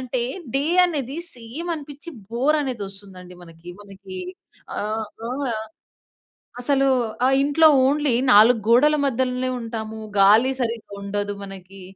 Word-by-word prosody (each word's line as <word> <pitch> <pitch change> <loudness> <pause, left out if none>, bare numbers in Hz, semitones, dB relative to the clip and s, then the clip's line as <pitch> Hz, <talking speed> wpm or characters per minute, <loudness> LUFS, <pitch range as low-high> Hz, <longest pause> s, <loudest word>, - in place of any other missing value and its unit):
అంటే 255 -1 -2 0.3
డే 275 - +2 0.2
అనేది 285 -5 -3 0.2
సేమ్ 250 +9 -8
అనిపించి 295 +2 -9 0.2
బోరనేది 260 -1 0
వస్తుందండి 190 -2 -12
మనకి. 165 0 -15
మనకి 195 -2 -11 0.6
ఆహ్, 215 +1 -2 0.2
ఆ! - - -4 1.3
అసలు 275 +1 +2 0.4
ఆహ్, 270 +1 +4
ఇంట్లో 315 +3 +5 0.2
ఓన్లీ 285 -1 +2 0.2
4 225 +3 +7
గోడల 285 +6 +5
మధ్యలనే 255 -1 -1
ఉంటాము, 220 -1 -6 0.2
గాలి 215 +7 +6
సరిగ్గా 230 -3 -4
ఉండదు 205 0 -3
మనకి. 195 0 -11
235 Hz, 115 wpm, -22 LUFS, 205-275 Hz, 1.3 s, 4